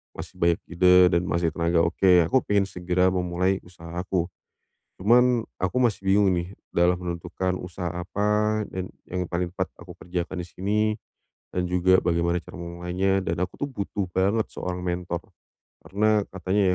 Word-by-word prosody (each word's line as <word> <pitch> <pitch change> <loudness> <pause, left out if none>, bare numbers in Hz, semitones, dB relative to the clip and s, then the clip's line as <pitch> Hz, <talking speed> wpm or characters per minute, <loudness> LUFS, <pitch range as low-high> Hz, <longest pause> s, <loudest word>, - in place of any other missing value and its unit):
masih - - -8
banyak 85 0 +3
ide 90 +1 +5 0.2
dan 85 -1 +3
masih 85 -1 +1
tenaga 85 0 +2
oke, 90 +2 +3 0.2
aku 130 - +4
pengen 100 -1 +3
segera 90 0 +1
memulai 90 +1 0
usaha 85 -2 -12
aku. 90 -1 -1 0.8
Cuman 120 +3 +5 0.2
aku 95 +5 -1
masih 110 -5 +1
bingung 100 +1 +4
nih 85 +3 -4 0.2
dalam 90 +1 +3
menentukan 90 +1 -3
usaha 90 -1 -5
apa 105 +5 0
dan 95 0 -4 0.2
yang 90 0 -2
paling 90 0 -2
tepat 95 +1 -2
aku 85 +1 -10
kerjakan 90 +1 -4
di - - -16
sini, 100 +4 -2 0.8
dan 90 0 +1
juga 90 +1 +4
bagaimana 85 0 +1
cara - - -11
memulainya, 90 +3 -1
dan 85 - -1
aku 90 - -2
tuh 145 - -2
butuh 100 -2 -3
banget 100 +5 +2
seorang 90 0 -4
mentor 90 -1 -2 0.6
karena 105 +1 +2
katanya 95 +2 0
90 Hz, 160 wpm, -25 LUFS, 85-95 Hz, 0.8 s, ide